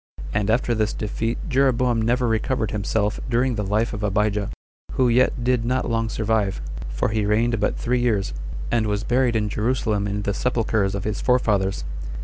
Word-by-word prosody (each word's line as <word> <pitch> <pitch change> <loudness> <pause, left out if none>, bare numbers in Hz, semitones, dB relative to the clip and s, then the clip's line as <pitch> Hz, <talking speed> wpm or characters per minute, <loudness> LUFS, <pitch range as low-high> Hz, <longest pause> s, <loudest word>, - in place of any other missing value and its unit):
And 105 0 0
after 120 +1 +2
this 110 -2 0
defeat 115 +2 -2
Jeroboam 125 -4 +2
never 120 +2 +1
recovered 115 +1 0
himself 105 0 -1
during 125 +2 +2
the 105 -2 -2
life 105 +4 0
of 105 - -4
Abijah, 105 0 0 0.4
who 130 - +3
yet 120 0 +2
did 125 -1 +2
not 125 +2 0
long 115 -1 0
survive, 110 -3 0 0.3
for - - -1
he 110 0 0
reigned 115 +2 +2
but 105 - 0
three 125 +1 0
years, 110 -5 0 0.4
and 115 -2 +2
was 105 0 -1
buried 125 -1 +2
in 105 -1 +1
Jerusalem 105 -1 0
in 105 0 -2
the 100 - 0
sepulchers 110 -4 0
of 100 - -3
his 105 0 -2
forefathers. 100 - +1
110 Hz, 175 wpm, -23 LUFS, 105-120 Hz, 0.4 s, who